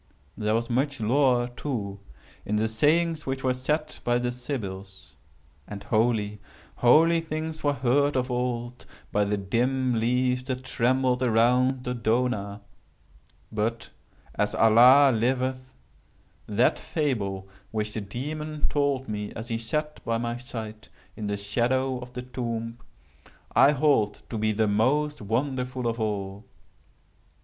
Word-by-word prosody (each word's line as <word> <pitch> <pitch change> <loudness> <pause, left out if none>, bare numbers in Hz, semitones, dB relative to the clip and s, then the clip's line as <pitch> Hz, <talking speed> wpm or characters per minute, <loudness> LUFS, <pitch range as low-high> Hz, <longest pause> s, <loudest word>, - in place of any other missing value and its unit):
There 110 0 0
was 115 +1 -1
much 135 +3 0
lore 125 +1 +3
too 115 -6 -5 0.4
in 105 - -2
the 110 +1 +1
sayings 155 +7 +1
which 135 0 -3
were 130 -1 +2
said 150 +4 -2
by 120 0 +2
the 120 0 -1
Sybils; 95 - -7 0.5
and 100 -1 -7
holy, 110 -2 0 0.4
holy 165 +7 +5
things 160 0 -5
were 145 -1 +2
heard 140 +3 +2
of 125 0 -1
old 125 0 -3 0.2
by 105 0 +2
the 105 +1 0
dim 125 +6 0
leaves 125 +2 +1
that 130 -1 -4
trembled 130 0 +1
around 125 +2 +3
Dodona—but, 115 -1 -4 0.4
as - - 0
Allah 125 +5 +7
liveth, 130 +2 -1 0.7
that 110 +4 +2
fable 100 - -2 0.2
which 105 -1 -3
the 110 - -3
Demon 150 +8 -4
told 140 -2 0
me 105 -1 -4
as 115 +3 -7
he 115 -1 -1
sat 150 +6 -3
by 115 0 0
my 120 0 -2
side 110 -3 -8 0.3
in 105 -2 -5
the 100 0 -1
shadow 125 +5 0
of 125 0 -10
the 125 0 -5
tomb, 115 -2 -4 0.8
I 145 - +6
hold 135 -8 +1
to 115 - -3
be 110 0 +1
the 110 +1 +1
most 140 +8 +1
wonderful 125 +3 -2
of 115 0 -1
all! 100 -1 -3
120 Hz, 135 wpm, -26 LUFS, 110-130 Hz, 0.8 s, Allah